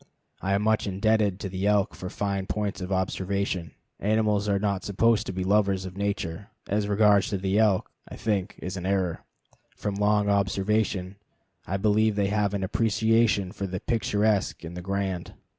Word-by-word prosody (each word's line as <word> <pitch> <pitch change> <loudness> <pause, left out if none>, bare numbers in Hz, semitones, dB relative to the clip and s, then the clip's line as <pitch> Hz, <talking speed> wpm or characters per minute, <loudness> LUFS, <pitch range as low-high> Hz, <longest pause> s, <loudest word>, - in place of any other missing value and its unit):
I 95 - 0
am 100 - 0
much 110 -1 +2
indebted 100 0 +1
to - - -3
the 95 +1 -2
elk 105 -2 +2
for 90 - -6
fine 100 -1 -2
points 105 -2 -2
of 90 +1 -5
observation. 95 -2 -1 0.2
Animals 105 -1 +1
are 100 - +3
not 100 -1 -1
supposed 110 +2 +2
to - - -2
be 95 0 -3
lovers 100 -1 +2
of 95 -1 -7
nature. 100 -1 -3 0.2
As 105 +1 0
regards 105 -1 +4
the 95 0 0
elk, 105 -4 +3 0.2
this, - - -9
I - - -14
think, 105 -2 0
is 95 +1 -5
an 90 0 -4
error. 95 -3 0 0.5
From 105 - -2
long 105 +1 +2
observation, 100 -1 0 0.5
I 95 - -1
believe 105 +1 +2
they 100 -1 +1
have 105 -1 +1
an 100 - -2
appreciation 110 0 +2
of 100 0 -5
the 95 0 -3
picturesque 105 -4 0
and 85 +1 -7
the 90 - -5
grand. 95 -1 -3
100 Hz, 175 wpm, -26 LUFS, 95-105 Hz, 0.5 s, regards